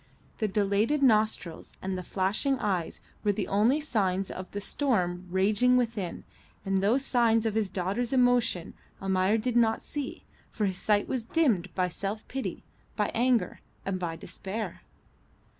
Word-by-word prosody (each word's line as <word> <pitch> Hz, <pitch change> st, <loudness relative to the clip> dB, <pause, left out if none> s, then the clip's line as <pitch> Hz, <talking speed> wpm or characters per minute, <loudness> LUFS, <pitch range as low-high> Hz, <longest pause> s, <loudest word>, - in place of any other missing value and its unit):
The 215 Hz, -, +1 dB
dilated 210 Hz, +8 st, +1 dB
nostrils 215 Hz, -8 st, +1 dB
and 190 Hz, 0 st, -3 dB
the 185 Hz, -, -3 dB
flashing 200 Hz, +10 st, 0 dB
eyes 190 Hz, -8 st, -2 dB, 0.2 s
were 205 Hz, -1 st, +3 dB
the 200 Hz, 0 st, -2 dB
only 220 Hz, +9 st, +3 dB
signs 195 Hz, -10 st, 0 dB
of 185 Hz, 0 st, -7 dB
the 205 Hz, -, -4 dB
storm 185 Hz, -7 st, 0 dB
raging 205 Hz, +7 st, +3 dB
within, 225 Hz, -7 st, -2 dB, 0.4 s
and 195 Hz, 0 st, +1 dB
those 235 Hz, +8 st, +2 dB
signs 230 Hz, -3 st, +3 dB
of 220 Hz, -, +1 dB
his 215 Hz, -3 st, 0 dB
daughter's 195 Hz, +7 st, -2 dB
emotion 245 Hz, -9 st, +2 dB, 0.3 s
Almayer 190 Hz, +2 st, +2 dB
did 235 Hz, +2 st, -1 dB
not 225 Hz, -2 st, +4 dB
see, 290 Hz, -2 st, -6 dB, 0.3 s
for 215 Hz, -, -1 dB
his 190 Hz, -2 st, -1 dB
sight 210 Hz, -1 st, +2 dB
was 255 Hz, -3 st, -1 dB
dimmed 230 Hz, -, +1 dB
by 185 Hz, -1 st, +2 dB
self 200 Hz, +4 st, -5 dB
pity, 270 Hz, 0 st, -4 dB, 0.3 s
by -, -, 0 dB
anger, 245 Hz, 0 st, +1 dB, 0.2 s
and 190 Hz, -1 st, -1 dB
by 170 Hz, -2 st, -3 dB
despair. 200 Hz, +6 st, -6 dB
210 Hz, 155 wpm, -28 LUFS, 190-240 Hz, 0.4 s, not